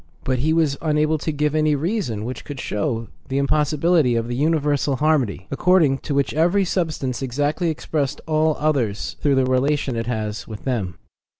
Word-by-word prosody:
But 130 Hz, -1 st, 0 dB
he 155 Hz, +5 st, +1 dB
was 160 Hz, -4 st, +2 dB
unable 155 Hz, 0 st, +1 dB
to 155 Hz, -, -2 dB
give 150 Hz, 0 st, 0 dB
any 155 Hz, -1 st, +2 dB
reason 145 Hz, -, -2 dB
which 125 Hz, +2 st, -5 dB
could 145 Hz, -2 st, -7 dB
show 115 Hz, +2 st, -2 dB, 0.2 s
the 135 Hz, 0 st, -2 dB
impossibility 150 Hz, 0 st, +2 dB
of 115 Hz, 0 st, -1 dB
this 120 Hz, -, -2 dB
universal 145 Hz, -1 st, +1 dB
harmony, 135 Hz, -, +1 dB
according 150 Hz, -2 st, +3 dB
to 145 Hz, -, -3 dB
which 140 Hz, -1 st, +1 dB
eveiy 175 Hz, +5 st, +3 dB
substance 155 Hz, -9 st, -2 dB
exactly 145 Hz, +6 st, 0 dB
expresses 150 Hz, -2 st, -2 dB
all 155 Hz, -1 st, +2 dB
others 130 Hz, -9 st, 0 dB
through 145 Hz, -2 st, +3 dB
the 130 Hz, -1 st, +3 dB
relations 130 Hz, 0 st, +1 dB
it 115 Hz, -, -4 dB
has 110 Hz, -2 st, -3 dB
with 110 Hz, -2 st, -8 dB
them. 105 Hz, -10 st, -2 dB
145 Hz, 175 wpm, -22 LUFS, 125-155 Hz, 0.2 s, according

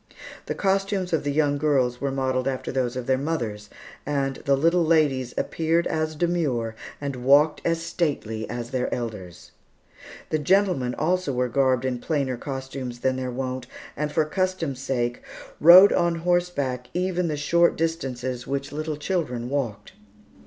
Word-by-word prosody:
The -, -, -2 dB
costumes 195 Hz, -2 st, 0 dB
of 160 Hz, -, +1 dB
the 145 Hz, -, -1 dB
young 145 Hz, -1 st, +1 dB
girls 130 Hz, -5 st, +1 dB
were 140 Hz, -, 0 dB
modelled 130 Hz, -1 st, -1 dB
after 130 Hz, -1 st, -2 dB
those 125 Hz, -2 st, -1 dB
of 125 Hz, -1 st, -4 dB
their 130 Hz, 0 st, +1 dB
mothers; 115 Hz, -9 st, -3 dB, 0.3 s
and 135 Hz, -2 st, -1 dB
the 140 Hz, -1 st, +3 dB
little 170 Hz, +4 st, +3 dB
ladies 145 Hz, -6 st, +2 dB
appeared 165 Hz, +1 st, 0 dB
as 155 Hz, 0 st, -1 dB
demure 150 Hz, -9 st, 0 dB, 0.3 s
and 140 Hz, -2 st, -4 dB
walked 140 Hz, +5 st, +4 dB
as 165 Hz, 0 st, 0 dB
stately 125 Hz, -11 st, -2 dB
as 120 Hz, 0 st, -5 dB
their 125 Hz, -1 st, -1 dB
elders. 105 Hz, -8 st, -6 dB, 0.8 s
The 155 Hz, -, +1 dB
gentlemen 175 Hz, -7 st, +2 dB
also 175 Hz, -2 st, 0 dB
were 125 Hz, 0 st, 0 dB
garbed 130 Hz, 0 st, +2 dB
in 125 Hz, -2 st, -1 dB
plainer 140 Hz, -3 st, -1 dB
costumes 130 Hz, -1 st, -6 dB
than 130 Hz, 0 st, +1 dB
their 130 Hz, -1 st, -3 dB
wont, 130 Hz, 0 st, -4 dB, 0.3 s
and, 150 Hz, +1 st, -2 dB
for 155 Hz, 0 st, +2 dB
custom's 170 Hz, -5 st, -2 dB
sake, 120 Hz, -3 st, -2 dB, 0.4 s
rode 180 Hz, +5 st, +9 dB
on 170 Hz, -1 st, +2 dB
horseback 165 Hz, -8 st, -1 dB
even 180 Hz, -1 st, 0 dB
the 150 Hz, -2 st, -2 dB
short 170 Hz, +4 st, +3 dB
distances 130 Hz, -7 st, -3 dB
which 140 Hz, +1 st, -3 dB
little 155 Hz, 0 st, -3 dB
children 145 Hz, -8 st, -2 dB
walked. 130 Hz, -7 st, -3 dB
140 Hz, 155 wpm, -24 LUFS, 125-165 Hz, 0.8 s, rode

